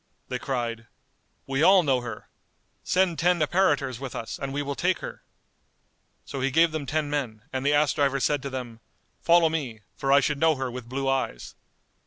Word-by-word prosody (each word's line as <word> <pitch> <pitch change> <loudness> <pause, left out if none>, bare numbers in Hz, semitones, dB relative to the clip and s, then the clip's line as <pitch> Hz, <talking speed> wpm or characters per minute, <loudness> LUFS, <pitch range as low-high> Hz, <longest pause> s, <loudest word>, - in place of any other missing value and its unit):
They - - -3
cried, 115 -4 -3 0.6
"We 135 +1 -1
all 185 +2 +6
know 135 -4 +2
her: 120 -1 -7 0.6
send 180 -3 +1
ten 175 +1 +3
apparitors 145 -6 +1
with 135 -2 -6
us, 115 - -5
and 135 -1 -4
we 145 +1 -2
will 140 0 -3
take 180 +5 +1
her." - - -8 1.0
So 135 - -5
he 135 - +1
gave 165 +4 +4
them 155 -3 -4
ten 155 +1 -1
men, 125 -7 -3
and 130 0 -2
the 145 +1 +2
ass 145 -3 +3
driver 140 -2 +1
said 145 +1 +1
to 140 - -5
them, 125 -4 -6 0.4
"Follow 170 -1 +5
me, 135 -9 -3
for 135 - -1
I 140 - +7
should 145 0 -1
know 160 0 +4
her 130 -2 -3
with 120 -1 -8
blue 135 +1 -2
eyes." 135 - -2
140 Hz, 195 wpm, -26 LUFS, 130-155 Hz, 1.0 s, I